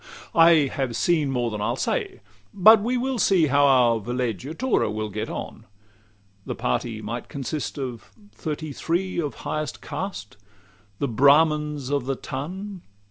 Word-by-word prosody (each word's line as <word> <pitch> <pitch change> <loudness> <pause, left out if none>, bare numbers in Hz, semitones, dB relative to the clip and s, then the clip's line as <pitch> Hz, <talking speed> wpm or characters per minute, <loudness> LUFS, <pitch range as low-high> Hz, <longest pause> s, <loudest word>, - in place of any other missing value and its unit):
LXXXIII 475 -1 -16
I 165 -3 +6
have 130 -4 -2
seen 155 +1 +1
more 120 -3 -1
than 105 -1 -4
I'll 115 +3 0
say: 395 - -2 0.3
but 215 +3 +7
we 245 +4 0
will 255 0 -1
see 185 -5 +4
How 145 0 +4
our 120 -4 +4
villeggiatura 125 - -1
will 110 0 -3
get 110 +2 -4
on. - - -7 0.8
The - - -5
party 110 - -2
might 115 +4 -5
consist 140 +3 -4
of 125 -4 -6 0.2
thirty 155 -1 -5
three 175 +5 -1
Of 145 -7 -4
highest 155 0 -3
caste 180 - -6 0.6
the 140 - -1
Brahmins 150 +2 +3
of 140 -3 -1
the 135 - 0
ton. 185 +10 -6
145 Hz, 150 wpm, -24 LUFS, 120-175 Hz, 0.8 s, but